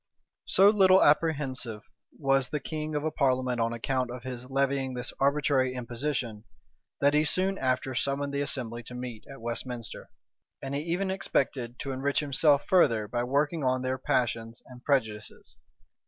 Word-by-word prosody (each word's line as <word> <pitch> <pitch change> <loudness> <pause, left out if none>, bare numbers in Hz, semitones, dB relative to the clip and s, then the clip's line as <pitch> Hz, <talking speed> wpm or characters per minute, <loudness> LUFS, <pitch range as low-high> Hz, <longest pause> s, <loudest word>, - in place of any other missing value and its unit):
So 195 +2 +6
little 190 -2 +6
apprehensive 140 -8 +1 0.3
was 135 -3 +2
the 150 - -2
king 155 0 -4
of 150 - -1
a 155 - -1
parliament 130 -4 +1
on 115 0 +1
account 125 +2 -1
of 125 -1 -7
his 125 -1 -7
levying 135 -1 0
this 125 0 -2
arbitrary 135 -2 +2
imposition, 120 -3 -3 0.6
that 140 +1 +4
he 150 +1 +4
soon 190 +5 +1
after 130 0 0
summoned 140 +2 -1
that 140 - 0
assembly 120 -4 -3
to 125 +2 -10
meet 125 -3 -6
at 135 - -10
Westminster; 120 0 -5 0.5
and 135 0 -6
he 140 - -1
even 180 +4 -1
expected 130 -9 -1
to 135 - -4
enrich 135 +2 0
himself 145 0 +3
further 115 - +3
by 120 +3 -2
working 145 +5 0
on 130 0 +1
their 130 0 -1
passions 115 -2 -1
and 125 0 -14
prejudices. 110 -7 -2
130 Hz, 160 wpm, -28 LUFS, 125-145 Hz, 0.6 s, So